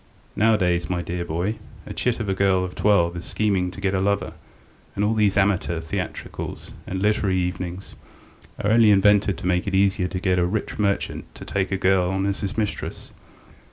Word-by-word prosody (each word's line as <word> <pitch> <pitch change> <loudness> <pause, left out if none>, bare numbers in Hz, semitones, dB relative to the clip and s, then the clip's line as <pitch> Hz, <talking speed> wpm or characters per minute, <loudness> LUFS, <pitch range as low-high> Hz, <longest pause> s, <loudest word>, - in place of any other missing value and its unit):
Nowadays, 90 -6 +2
my 90 -1 -1
dear 85 0 -3
boy, 85 +6 -2 0.3
a - - -7
chit 125 -2 -1
of 110 - -3
a 95 - +1
girl 95 -1 +2
of 90 - -7
twelve 85 -5 +2
is 85 - -6
scheming 100 -4 0
to 95 - -10
get 100 -1 0
a 95 - +1
lover, 100 +1 0 0.6
and 100 - +1
all 110 - +2
these 105 -3 +2
amateur 95 -4 +1
theatricals 80 -1 -5 0.2
and 95 - -3
literary 100 -2 +1
evenings 90 +1 -4 0.7
are 105 - +1
only 115 -1 +6
invented 100 -2 +4
to - - -8
make 90 0 +1
it 95 - 0
easier 95 -1 +2
to 90 - -4
get 90 -1 +1
a 90 - +3
rich 105 +3 -3
merchant 100 -1 -1
to - - -10
take 95 -1 -1
a 95 - +1
girl 95 -1 +2
on 95 +1 -1
as 100 0 -1
his 100 0 -4
mistress. 105 -2 -3
95 Hz, 195 wpm, -23 LUFS, 90-105 Hz, 0.7 s, only